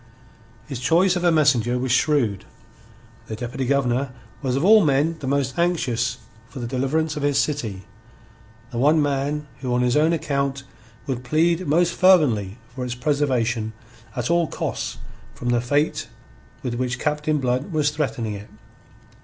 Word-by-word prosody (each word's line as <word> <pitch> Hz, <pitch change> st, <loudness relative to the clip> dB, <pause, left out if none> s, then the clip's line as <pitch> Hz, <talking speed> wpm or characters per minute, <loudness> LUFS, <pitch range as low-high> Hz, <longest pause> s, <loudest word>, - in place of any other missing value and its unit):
His 135 Hz, -, -6 dB
choice 175 Hz, +8 st, +3 dB
of 180 Hz, -, -2 dB
a 175 Hz, -, +4 dB
messenger 130 Hz, -6 st, +3 dB
was 125 Hz, 0 st, -1 dB
shrewd. 125 Hz, -7 st, +1 dB, 0.8 s
The 110 Hz, -, -5 dB
Deputy 125 Hz, +3 st, -4 dB
Governor 135 Hz, -1 st, +1 dB, 0.3 s
was 130 Hz, -3 st, -1 dB
of 140 Hz, +5 st, +1 dB
all 215 Hz, +1 st, +7 dB
men 150 Hz, +2 st, +2 dB
the 135 Hz, -, -5 dB
most 135 Hz, 0 st, 0 dB
anxious 130 Hz, -9 st, 0 dB, 0.3 s
for 130 Hz, -, -12 dB
the 120 Hz, -, -4 dB
deliverance 135 Hz, +6 st, -1 dB
of 150 Hz, -, -4 dB
his 145 Hz, -1 st, +1 dB
city, 130 Hz, -9 st, -1 dB, 0.9 s
the 120 Hz, -, -3 dB
one 150 Hz, +5 st, +4 dB
man 145 Hz, +1 st, -1 dB
who 130 Hz, -2 st, -3 dB
on 125 Hz, -, +2 dB
his 125 Hz, 0 st, +2 dB
own 155 Hz, +2 st, +4 dB
account 140 Hz, -4 st, -1 dB, 0.4 s
would 125 Hz, -2 st, -3 dB
plead 165 Hz, +6 st, +1 dB
most 170 Hz, +3 st, +3 dB
fervently 125 Hz, -, +3 dB, 0.2 s
for 130 Hz, 0 st, -5 dB
its 125 Hz, -1 st, -3 dB
preservation 125 Hz, -5 st, 0 dB, 0.4 s
at 125 Hz, +2 st, -1 dB
all 170 Hz, -1 st, +3 dB
costs -, -, -4 dB, 0.4 s
from 120 Hz, -, -4 dB
the 120 Hz, -1 st, +2 dB
fate 145 Hz, +5 st, 0 dB, 0.6 s
with 125 Hz, -, -2 dB
which 120 Hz, 0 st, -2 dB
Captain 150 Hz, +2 st, 0 dB
Blood 130 Hz, +5 st, -1 dB
was 150 Hz, -2 st, +1 dB
threatening 130 Hz, -7 st, -2 dB
it. 100 Hz, +1 st, -9 dB
140 Hz, 160 wpm, -23 LUFS, 125-155 Hz, 0.9 s, all